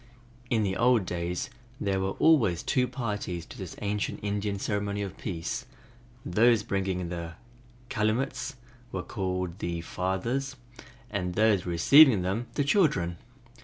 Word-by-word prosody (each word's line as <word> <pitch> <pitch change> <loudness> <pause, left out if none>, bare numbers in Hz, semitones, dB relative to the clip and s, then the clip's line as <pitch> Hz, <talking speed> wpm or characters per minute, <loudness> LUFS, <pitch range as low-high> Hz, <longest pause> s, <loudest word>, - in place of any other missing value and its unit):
In 110 -3 +2
the 95 -2 0
old 120 -2 +3
days 90 +9 -3 0.3
there 95 -1 0
were 95 +1 -1
always 120 - +4
two 125 -1 +2
parties 105 -9 -4
to - - -12
this 95 -4 -6
ancient 105 0 -2
Indian 100 0 -1
ceremony 100 0 -2
of 100 - -6
peace: 90 +8 -4 0.6
those 110 +4 +4
bringing 95 -4 -2
the 85 -1 -5 0.5
calumets 120 +4 -1 0.4
were 90 - -3
called 90 -2 -3
"the 85 -3 -3
fathers" 105 +11 -2 0.6
and 90 -3 -2
those 105 -5 +3
receiving 105 - +7
them 100 +6 -2
"the 145 - +2
children". 135 - +2
100 Hz, 130 wpm, -28 LUFS, 90-120 Hz, 0.6 s, receiving